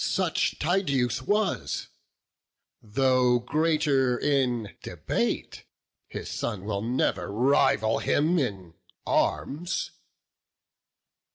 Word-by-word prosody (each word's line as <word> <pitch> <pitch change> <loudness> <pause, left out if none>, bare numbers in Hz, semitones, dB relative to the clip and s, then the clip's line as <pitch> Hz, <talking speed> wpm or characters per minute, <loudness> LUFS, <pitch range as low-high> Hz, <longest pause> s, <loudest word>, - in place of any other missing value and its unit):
Such - - 0
Tydeus 140 - 0
was: 205 +6 -1 0.9
though 125 +2 +2
greater 145 -1 +1
in 125 -6 0
debate, - - -3 0.4
His - - -7
son 105 -5 -4
will 100 -2 -2
never 110 -6 -1
rival 115 -1 +2
him 165 +4 +2
in 95 - -3 0.3
arms." 175 +6 -1
130 Hz, 80 wpm, -27 LUFS, 115-145 Hz, 0.9 s, though